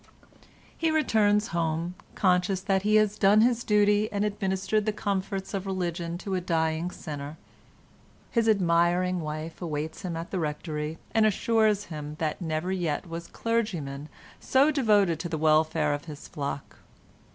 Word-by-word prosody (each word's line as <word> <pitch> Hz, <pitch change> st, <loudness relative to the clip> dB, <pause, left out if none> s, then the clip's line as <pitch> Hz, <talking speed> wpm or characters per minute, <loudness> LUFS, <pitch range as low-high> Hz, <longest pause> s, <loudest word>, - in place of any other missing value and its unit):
He 325 Hz, -, 0 dB
returns 215 Hz, -9 st, +2 dB
home, 165 Hz, +1 st, -1 dB, 0.2 s
conscious 185 Hz, 0 st, +2 dB
that 190 Hz, 0 st, +1 dB
he 210 Hz, +2 st, +2 dB
has 210 Hz, -1 st, +3 dB
done 205 Hz, +2 st, +6 dB
his 240 Hz, 0 st, +2 dB
duty, 210 Hz, 0 st, +3 dB
and 205 Hz, 0 st, 0 dB
administered 205 Hz, +1 st, -1 dB
the -, -, +3 dB
comforts 195 Hz, -1 st, -3 dB
of 195 Hz, 0 st, -3 dB
religion 175 Hz, -2 st, -2 dB
to 195 Hz, -, -2 dB
a 185 Hz, -, 0 dB
dying 160 Hz, -1 st, 0 dB
sinner. 150 Hz, -3 st, -7 dB, 0.9 s
His 230 Hz, -2 st, +2 dB
admiring 180 Hz, -1 st, +2 dB
wife 155 Hz, +1 st, -5 dB
awaits 155 Hz, -2 st, -4 dB
him 175 Hz, -4 st, -4 dB
at 165 Hz, +1 st, -6 dB
the 190 Hz, -, -1 dB
Rectory, 150 Hz, 0 st, -3 dB, 0.2 s
and 220 Hz, -1 st, +4 dB
assures 215 Hz, 0 st, +2 dB
him 150 Hz, 0 st, -6 dB
that 155 Hz, +2 st, -2 dB
never 160 Hz, +2 st, -2 dB
yet 175 Hz, -4 st, -2 dB
was 170 Hz, 0 st, -6 dB
clergyman 170 Hz, -12 st, -2 dB, 0.3 s
so 275 Hz, +3 st, +3 dB
devoted 205 Hz, -, +3 dB
to 170 Hz, -, -4 dB
the 160 Hz, -, -2 dB
welfare 155 Hz, -1 st, +3 dB
of 145 Hz, +1 st, -4 dB
his 150 Hz, -2 st, -9 dB
flock. 140 Hz, -1 st, -5 dB
180 Hz, 150 wpm, -27 LUFS, 160-210 Hz, 0.9 s, done